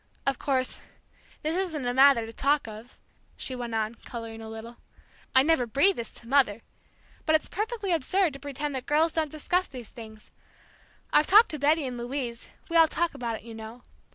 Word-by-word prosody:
Of 275 -2 0
course, 260 -3 -1 0.6
this 310 +2 0
isn't 340 -8 -2
a 245 - 0
matter 265 -3 +6
to 225 - -9
talk 280 +2 +1
of," 220 +3 -11 0.4
she 260 - -3
went 240 -2 -4
on, 220 0 -1
coloring 230 -2 -7
a 220 - -8
little. 225 +2 -9 0.6
"I'd 260 +1 +7
never 310 -7 +3
breathe 285 - +3
this 230 - -3
to 230 - -9
Mother! 235 -5 +2 0.6
But 315 - +5
it's 310 - +1
perfectly 425 -1 -3
absurd 335 +2 +1
to 275 - -8
pretend 285 +1 -4
that 260 -2 -5
girls 315 +3 +3
don't 315 -2 0
discuss 350 +5 -1
these 250 -5 -10
things. 220 -2 -12 0.8
I've 300 - +5
talked 430 +4 +7
to 305 - -4
Betty 300 +2 +3
and 250 -2 -5
Louise 240 -1 -5 0.2
we 335 - +1
all 325 -1 +7
talk 340 +2 -1
about 240 -5 -3
it, - - -10
you 230 0 -9
know. 225 +2 -10
270 Hz, 195 wpm, -27 LUFS, 235-315 Hz, 0.8 s, I'd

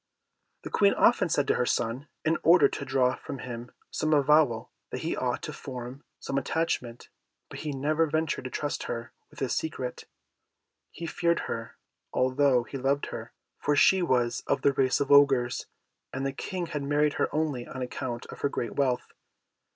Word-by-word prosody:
The - - -7
Queen 200 -1 +4
often 230 -6 +4
said 145 -3 +1
to - - +4
her 125 - +1
son, 125 +6 -1 0.2
in 160 +1 +2
order 175 +2 +6
to 140 - -5
draw 130 -1 +2
from - - -7
him 120 -1 -7 0.2
some 155 0 +1
avowal, 145 -5 +3 0.2
that - - -5
he - - -1
ought - - -2
to - - -5
form 130 +1 -7 0.2
some 135 - -1
attachment; 130 -5 -2 0.4
but - - -8
he 150 - -3
never 150 +4 +1
ventured 155 -3 -1
to - - -3
trust 145 +3 -3
her 120 0 -5 0.2
with - - -19
his 130 - 0
secret. 130 -6 -3 0.8
He 170 - -7
feared 170 +1 +1
her, - - -5 0.3
although 130 -1 +3
he 135 +3 -7
loved 140 +2 0
her, - - -6 0.3
for 145 - +1
she 190 +6 +5
was 125 -8 +1
of 140 - 0
the 140 - +4
race 130 -1 +2
of 140 0 -1
Ogres, 135 -4 +4 0.4
and 135 +1 -3
the 135 - -1
King 180 +5 -4
had 150 -3 -4
married 145 +1 +2
her - - +2
only 150 -6 -1
on 130 - -5
account 125 -1 -4
of - - -10
her 140 - +2
great 120 - -3
wealth. 130 -3 0
140 Hz, 180 wpm, -28 LUFS, 125-150 Hz, 0.8 s, order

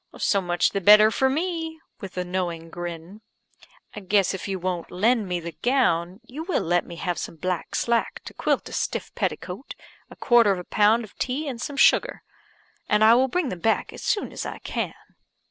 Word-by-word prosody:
"So 200 - +2
much 175 -1 +1
the 200 - -2
better 210 +3 +7
for 265 +3 +2
me," 325 +1 -2 0.2
(with 195 -5 -9
a 180 - 0
knowing 175 -2 -4
grin). 175 +4 -7 0.7
"I - - -5
guess 195 0 +2
if 190 - -5
you 195 -1 -2
won't 180 -1 -3
lend 215 +3 +1
me 180 -1 -1
the 170 0 -6
gown, 190 -7 +1
you 265 +6 -8
will 350 +3 -1
let 175 +1 +1
me 170 - -8
have 175 0 -3
some - - -6
black 180 +2 -3
slack 235 -1 0
to - - -9
quilt - - -1
a - - -9
stuff - - -3
petticoat, - - -4 0.3
a - - -12
quarter 235 -4 +4
of 190 - 0
a 180 - -6
pound 215 +5 +3
of 215 - -13
tea 275 +4 -2
and 245 -4 -5
some 285 +1 -5
sugar; - - +3 0.7
and 210 +1 +3
I 220 +1 +8
will 255 +2 +4
bring 325 +1 -1
them 180 - -5
back 220 +5 0
as - - -9
soon 410 - -1
as - - -5
I - - -5
can." - - -4
205 Hz, 205 wpm, -24 LUFS, 180-245 Hz, 0.7 s, I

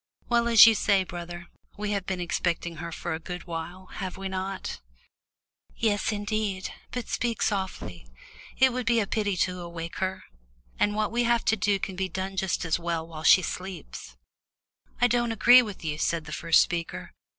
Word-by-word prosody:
Well, 235 -1 +3
as 230 -2 +9
you 225 - +7
say, 200 -2 +2
brother, 175 0 -7 0.3
we 210 0 -2
have 200 -2 -2
been 190 -1 -2
expecting 170 -1 -2
her 170 +1 -6
for - - -4
a 160 - -3
good 180 +1 -7
while, 170 +2 -6 0.2
have 185 -1 -4
we 195 0 -4
not?" 190 - -4 1.0
"Yes, 215 -1 +1
indeed, 205 -2 -2 0.2
but 250 -1 -5
speak 235 -3 -1
softly. 190 - -3 0.5
It 260 -1 +5
would 250 -2 -3
be 235 0 +4
a 210 - +1
pity 205 -2 -1
to 180 -1 -6
awake 170 -1 -7
her. 190 0 -2 0.6
And 205 0 +2
what 215 -1 0
we 240 +1 +1
have 235 -1 +2
to 220 - +3
do 205 -1 +1
can 190 0 -5
be 190 0 -2
done 190 +1 -4
just 190 -2 -1
as 165 +1 +1
well 170 -1 -2
while 160 -2 -8
she 185 +3 +6
sleeps." 185 0 -7 0.8
"I 245 - +5
don't 240 0 +2
agree 245 +3 +7
with 205 -7 -7
you," 150 -1 -2
said 165 0 0
the 155 - -9
first 165 +1 +4
speaker. 170 -2 -5
190 Hz, 185 wpm, -27 LUFS, 170-215 Hz, 1.0 s, as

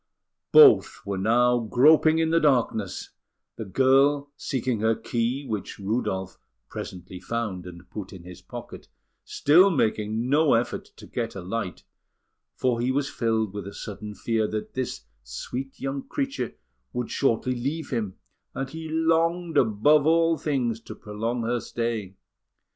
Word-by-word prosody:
Both 445 -4 +7
were 100 -1 -2
now 120 +4 +3
groping 150 +8 +5
in 160 0 +1
the 165 - +4
darkness, 120 - 0 0.4
the 110 - -6
girl 135 +6 +3
seeking 130 -5 -2
her 110 +1 +2
key, 120 +6 -2
which 105 -6 -4
Rudolf 95 -2 -2 0.3
presently 90 0 -7
found 95 -3 -4
and 85 0 -11
put 105 -3 -6
in 95 -3 -11
his 90 0 -11
own - - -37
pocket, - - -9 0.4
still 175 +7 +5
making 110 - 0
no 145 +1 +4
effort 115 +1 -1
to - - -12
get 115 -3 -4
a 95 - -5
light; 95 +1 -4 0.7
for 120 -2 0
he 125 +2 +1
was 140 +1 -1
filled 110 -3 0
with 100 -2 -6
a 100 - -9
sudden 105 0 -7
fear 110 -1 0
that 105 0 -5
this 130 - -3 0.2
sweet 125 - -6
young 135 0 -4
creature 275 -1 -3 0.4
would 125 -1 -3
shortly 130 -1 +1
leave 140 +7 -3
him, 110 -7 -2 0.4
and 135 0 -4
he 160 0 -7
longed 165 +1 +1
above 140 +7 +4
all 165 0 +4
things 125 -8 -1
to - - -9
prolong 115 +3 -3
her 120 +1 0
stay. 115 -5 -3
120 Hz, 150 wpm, -26 LUFS, 105-145 Hz, 0.7 s, Both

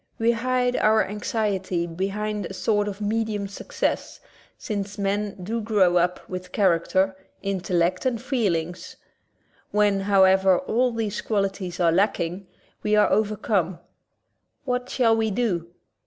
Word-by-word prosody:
We 230 +1 +3
hide 250 +1 0
our 215 0 +4
anxiety 195 -4 -1
behind 200 +3 -3
a 190 - -8
sort 205 +2 +1
of 205 0 -5
medium 210 -1 -1
success, 200 - -3 0.4
since 200 -2 -4
men 200 +1 -1
do 225 +5 -2
grow 200 -5 +3
up 180 +1 0
with 180 0 -6
character, 190 0 +2 0.3
intellect, 185 0 0
and 240 -3 -1
feelings. 185 - -2 0.7
When, 205 -1 +2
however, 190 -1 +4
all 250 -2 +1
these 220 -3 -2
qualities 195 -4 -2
are 170 -2 +4
lacking, 185 0 0 0.3
we 210 - +2
are 210 - +4
overcome. 205 -4 +1 0.9
What 250 -1 -2
shall 230 -3 +3
we 220 -1 +1
do? 195 -6 -1
200 Hz, 125 wpm, -24 LUFS, 185-220 Hz, 0.9 s, our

